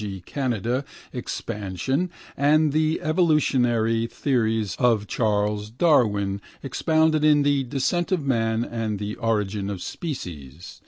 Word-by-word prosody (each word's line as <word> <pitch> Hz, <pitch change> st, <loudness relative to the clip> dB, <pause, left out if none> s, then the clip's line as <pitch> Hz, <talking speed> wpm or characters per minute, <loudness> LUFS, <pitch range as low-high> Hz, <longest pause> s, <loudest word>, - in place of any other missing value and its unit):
g. 100 Hz, -2 st, -5 dB
Canadian) 125 Hz, -1 st, -1 dB, 0.3 s
expansion 120 Hz, -, -3 dB, 0.3 s
and 150 Hz, +2 st, +3 dB
the 155 Hz, +1 st, +1 dB
evolutionary 125 Hz, -9 st, +2 dB
theories 115 Hz, -5 st, 0 dB
of 115 Hz, -5 st, +3 dB
Charles 105 Hz, -1 st, 0 dB
Darwin, 105 Hz, -, +2 dB, 0.2 s
expounded 155 Hz, +3 st, +2 dB
in 150 Hz, -1 st, +5 dB
The 140 Hz, -2 st, +2 dB
Descent 145 Hz, +8 st, -1 dB
of 170 Hz, -6 st, 0 dB
Man 115 Hz, -3 st, +1 dB
and 110 Hz, -3 st, -3 dB
The 105 Hz, +1 st, -4 dB
Origin 105 Hz, -3 st, -1 dB
of 100 Hz, -2 st, -4 dB
Species. 85 Hz, -, -7 dB
120 Hz, 115 wpm, -24 LUFS, 105-145 Hz, 0.3 s, in